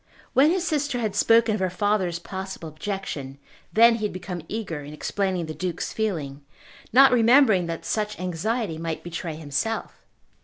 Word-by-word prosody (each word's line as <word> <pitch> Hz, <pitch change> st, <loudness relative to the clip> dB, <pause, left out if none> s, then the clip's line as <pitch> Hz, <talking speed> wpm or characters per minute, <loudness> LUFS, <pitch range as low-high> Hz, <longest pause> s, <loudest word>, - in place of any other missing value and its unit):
When 270 Hz, +4 st, +5 dB
his 365 Hz, +1 st, 0 dB
sister 290 Hz, -5 st, 0 dB
had 215 Hz, -4 st, -2 dB
spoken 225 Hz, +1 st, +4 dB
of 210 Hz, -, -1 dB
her 185 Hz, -1 st, +1 dB
father's 185 Hz, -2 st, 0 dB
possible 190 Hz, -1 st, -7 dB
objection, 155 Hz, -5 st, -5 dB, 0.3 s
then 230 Hz, +1 st, +6 dB
he 215 Hz, -, -2 dB
had 210 Hz, -, -3 dB
become 180 Hz, -1 st, -6 dB
eager 180 Hz, -9 st, -4 dB
in 145 Hz, +1 st, -9 dB
explaining 190 Hz, +1 st, -1 dB
the 155 Hz, -, -6 dB
Duke's 180 Hz, +1 st, -4 dB
feeling, 155 Hz, -10 st, -3 dB, 0.5 s
not 270 Hz, +3 st, +7 dB
remembering 230 Hz, -6 st, +5 dB
that 165 Hz, -1 st, -5 dB
such 210 Hz, -1 st, -2 dB
anxiety 185 Hz, +1 st, -2 dB
might 165 Hz, -1 st, -4 dB
betray 170 Hz, -1 st, -5 dB
himself. 160 Hz, +9 st, -3 dB
190 Hz, 160 wpm, -25 LUFS, 165-225 Hz, 0.5 s, not